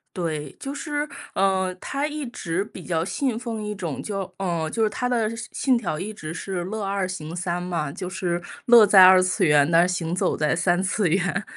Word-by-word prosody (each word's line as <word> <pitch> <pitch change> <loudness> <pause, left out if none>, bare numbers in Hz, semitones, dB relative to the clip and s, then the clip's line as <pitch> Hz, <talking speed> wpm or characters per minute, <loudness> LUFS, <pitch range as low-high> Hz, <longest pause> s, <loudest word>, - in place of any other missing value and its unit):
对， 155 -5 -3
就 275 +1 -5
是， 295 0 -3 0.3
呃， 190 -1 +1
他 280 +1 -2
一 300 -2 -4
直 190 -4 -3
比 185 - -11
较 165 -2 -1
信 225 +6 -2
奉 225 -3 -5
一 210 - -3
种 170 -8 -5
就 195 -3 -4
呃， 170 -4 -2
就 225 +4 0
是 215 - +3
他 250 +4 -2
的 230 -3 0
信 230 +1 -7
信 260 -3 +2
条 175 -9 -3
一 210 +5 -5
直 155 -5 -7
是 180 +1 -4
乐 215 +2 -4
二 195 -1 -1
行 165 -3 -6
三 175 0 -3
嘛。 170 -5 -2
就 180 -2 -5
是 175 -1 -2 0.2
乐 235 -3 +8
在 190 -2 +8
二 185 0 +7
次 185 +1 +1
元， 150 0 +4
但 170 +2 +5
是 180 - -1
行 170 -1 -3
走 185 - 0
在 150 0 +1
三 175 +2 +1
次 195 0 +1
元， 185 +3 0
185 Hz, 235 characters per minute, -24 LUFS, 170-215 Hz, 0.3 s, 乐